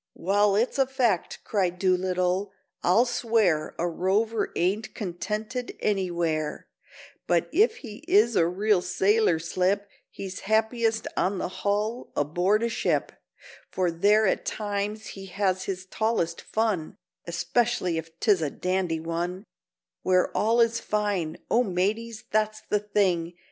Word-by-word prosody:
"Wall, 200 +2 +2
it's 235 +6 +1
a 270 - +4
fact," 245 -9 0
cried 185 -4 0
Doolittle, 185 +1 +1 0.3
"I'll 200 +8 +4
swear 225 -10 +1
A 175 - 0
rover 205 +6 0
ain't 210 +5 -1
contented 215 +6 -4
anywhere; 170 -6 -1 0.6
But 170 -2 +2
if 430 +8 +4
he 210 -2 -8
is 365 - +4
a 165 - +4
real 195 +2 +2
sailor 190 +1 +2
slip, 185 +5 0 0.2
He's 190 -1 -7
happiest 225 +1 +1
on 195 +1 0
the - - -2
hull—aboard 205 - 0
a 235 - +1
ship— 225 - 0 0.6
For 180 -2 0
there 205 +6 +4
at 190 - +1
times 210 0 -3
he 195 0 -9
has 185 0 -1
his 185 -1 -4
tallest 190 -5 -1
fun, 215 -8 -1 0.3
Especially 180 0 0
if 165 +1 -11
'tis 205 -6 +3
a 155 - 0
dandy 180 0 -1
one 170 +3 -3 0.6
Where 185 -1 +2
all 230 +3 +3
is 230 0 +2
fine—O 205 0 -1
mateys, 215 +4 -2
that's 215 0 0
the 210 - +2
thing!" 190 -5 0
200 Hz, 130 wpm, -26 LUFS, 180-220 Hz, 0.6 s, a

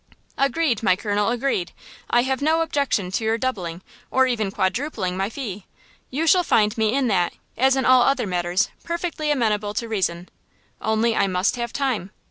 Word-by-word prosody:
"Agreed, 275 -3 +1
my 190 -4 +3
colonel, 205 +1 0
agreed! 235 -7 -1 0.4
I 240 0 +4
have 265 0 -1
no 320 +3 +2
objection 280 - 0
to 210 - -1
your 220 +1 +1
doubling, 190 -9 -3 0.3
or 260 0 +3
even 225 -5 0
quadrupling, 190 0 -1
my 195 +2 -1
fee. 215 -6 -6 0.4
You 300 +5 -1
shall 365 +2 +5
find 210 -9 +2
me 220 +1 +1
in 275 -1 +2
that, 180 -4 +1 0.2
as 265 +1 +3
in 265 - 0
all 255 -1 +6
other 275 -3 +2
matters, 180 +1 0
perfectly 335 -3 -3
amenable 210 -7 0
to 235 - -2
reason. 185 -5 -2 0.5
Only 220 +2 +1
I - - +2
must 185 +3 +1
have 235 -1 -4
time. 255 -9 -1
225 Hz, 175 wpm, -23 LUFS, 195-265 Hz, 0.5 s, all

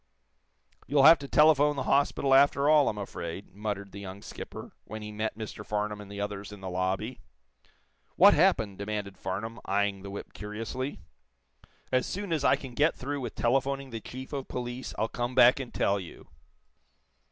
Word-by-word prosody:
"You'll 140 0 +3
have 160 +3 +9
to 140 - -7
telephone 150 0 +5
the 135 - -2
hospital, 140 0 +2
after 140 +1 +5
all, 150 -2 +5
I'm 105 - -4
afraid," 95 -2 -6
muttered 100 -1 -4
the 100 - -9
young 100 0 -8
skipper, - - -8
when 110 0 -8
he 105 - -6
met 110 +1 -3
Mr. 110 -1 -7
Farnum 105 0 -2
and 100 -1 -11
the 100 - -7
others 100 0 -4
in 105 - -10
the 95 -1 -6
lobby. 95 +7 -2 1.0
"What - - +8
happened?" 100 -4 +2
demanded 100 -1 -4
Farnum, 110 +5 -4
eyeing 100 0 0
the 100 - -8
whip 100 - -8
curiously. 115 +6 -5 0.9
"As 130 0 +2
soon 200 -3 -3
as 155 -3 0
I - - +5
can 130 -3 -9
get 150 +6 +2
through 140 +2 -4
with 120 -3 -5
telephoning 135 +2 0
the 115 -1 -5
chief 130 +5 -9
of 135 -2 -4
police, 125 +1 -5
I'll 110 - +1
come 120 +2 -3
back 125 +1 +7
and 130 -3 -6
tell 100 0 +1
you." 90 -3 -10
110 Hz, 180 wpm, -29 LUFS, 100-135 Hz, 1.0 s, have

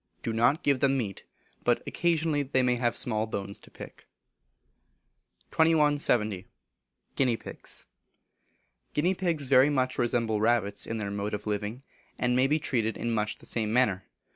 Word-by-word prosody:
Do 115 - -2
not 120 +7 +2
give 140 -2 +2
them 135 0 +2
meat, 105 -7 -4 0.4
but - - +1
occasionally 160 -3 0
they 130 -2 0
may 125 0 +2
I 120 - -3
have 120 -1 0
small 110 -3 0
bones 100 -2 -5
to - - -17
pick. - - -12 1.4
2170. 145 - +2 0.7
Guinea 125 -4 +2
Pigs. - - +1 1.1
Guinea 170 +6 +2
Pigs 170 -7 -1
very 130 +1 +5
much 130 -3 -1
resemble 115 -3 0
rabbits 110 -3 0
in 115 - -3
their 100 -2 -4
mode 100 +1 -3
of 105 - -8
living, 105 +4 -3 0.3
and 125 0 +1
may 130 +1 +3
be 150 +3 +2
treated 120 -7 -1
in 120 - -2
much 105 -1 -1
the - - -15
same 110 -2 -2
manner. 105 -6 +1
120 Hz, 160 wpm, -28 LUFS, 110-140 Hz, 1.4 s, very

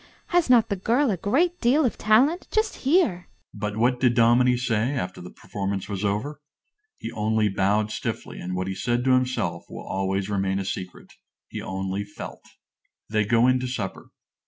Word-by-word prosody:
Has 350 -5 +2
not 235 -3 +5
the 200 - 0
girl 235 +7 +1
a - - +1
great 330 - +1
deal 265 +5 +4
of 240 - 0
talent? 260 +11 +3
Just 435 0 0
hear! 265 - +2 0.3
But 105 0 -4
what 125 +2 +2
did 125 -2 +3
Dominie 120 +2 +4
say 120 +1 0
after 90 -11 -4
the 90 - -9
performance 100 0 -4
was 100 -1 -4
over? 125 +9 -2 0.6
He - - -6
only 110 0 +1
bowed 100 +2 +1
stiffly, - - -5
and 90 +1 -4
what 90 0 -2
he 95 - -2
said 120 +5 -1
to 130 - +2
himself 130 0 0
will - - -8
always 95 0 -1
remain 95 -2 0
a 100 - -3
secret. 90 -1 -6 0.4
He - - -6
only 95 +1 -3
felt. 100 0 -9 0.7
They 110 -1 +2
go 115 +2 +3
in 130 0 +4
to 130 - -3
supper. 110 -7 -5
120 Hz, 180 wpm, -25 LUFS, -, 0.7 s, not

